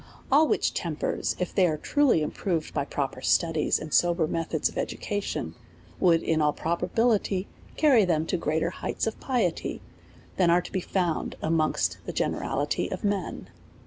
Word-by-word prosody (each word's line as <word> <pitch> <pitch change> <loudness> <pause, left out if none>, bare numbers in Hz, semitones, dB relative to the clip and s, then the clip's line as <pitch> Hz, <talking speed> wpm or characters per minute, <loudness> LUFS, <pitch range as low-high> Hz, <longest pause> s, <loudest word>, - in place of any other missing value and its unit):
All 300 +3 +6
which - - +1
tempers, 160 -3 -2
if 180 - -3
they 185 -3 +4
were 155 - -1
truly 265 - +2
improved 165 0 -2
by 140 -2 -1
proper 135 -3 -3
studies 165 +1 +2
and 155 0 -7
sober 175 -1 +3
methods 165 +1 -1
of - - -8
education, 210 - -3 0.5
would 170 -3 +4
in 160 -1 +1
all 150 -1 +3
probability 190 +3 0 0.3
carry 270 -8 +5
them 160 -4 +1
to 180 - -1
greater 160 +1 0
heights - - -3
of 225 - -3
piety 235 -11 -1 0.6
than 180 -2 +4
are 175 +1 +4
to - - -9
be 185 - -1
found 175 -3 -1
amongst 155 -1 0
the - - -3
generality - - -1
of - - -5
men. 200 -3 -2
175 Hz, 160 wpm, -27 LUFS, 160-205 Hz, 0.6 s, All